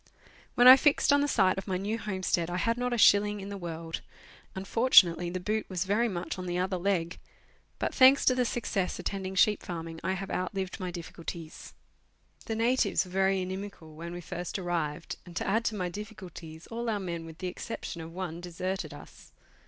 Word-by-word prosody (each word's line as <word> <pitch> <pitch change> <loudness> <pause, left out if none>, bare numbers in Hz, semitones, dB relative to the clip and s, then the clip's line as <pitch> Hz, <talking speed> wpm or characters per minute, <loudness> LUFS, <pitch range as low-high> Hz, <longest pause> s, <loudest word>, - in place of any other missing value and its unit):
When 245 - +6
I 260 +1 +12
fixed 285 0 +3
on 285 - +4
the 290 - +1
site 195 -8 +3
of 195 - -9
my 185 -2 0
new 210 +4 -2
homestead 185 -5 -1
I 175 - -2
had 230 +6 +1
not 245 +1 -2
a 240 - 0
shilling 205 -1 +5
in 195 0 -7
the 200 - -5
world; 165 -2 -5 0.5
unfortunately, 190 -4 +4
the 185 +1 -3
boot 215 +4 -2
was 185 -1 -2
very 215 +5 +2
much 185 -2 -4
on 185 - -5
the 175 0 -2
other 185 +1 0
leg, 175 -2 -1 0.6
but - - -2
thanks 265 +1 +6
to 255 - +5
the 250 0 +1
success 220 -6 -2
attending 190 +1 -4
sheep 210 +2 +4
farming 165 -2 -6
I 190 +2 0
have 190 +1 -5
outlived 185 +1 -3
my 185 -1 -3
difficulties. 170 -1 -8 0.7
The 225 - -2
natives 235 -1 +2
were 180 - -12
very 190 0 +2
inimical 185 -4 -7
when 170 +2 -7
we 175 0 -6
first 175 +2 -5
arrived, 170 -5 -3
and, 175 -2 -13
to - - -2
add 220 +4 +2
to 220 - 0
my 185 -3 -2
difficulties, 175 -5 -9
all 235 +1 -3
our 210 -2 0
men 170 -3 -4
with 160 -1 -11
the 185 - -6
exception 180 -2 -6
of 160 0 -8
one 175 -1 -5
deserted 185 +2 -4
us. - - -14
185 Hz, 200 wpm, -29 LUFS, 175-210 Hz, 0.7 s, I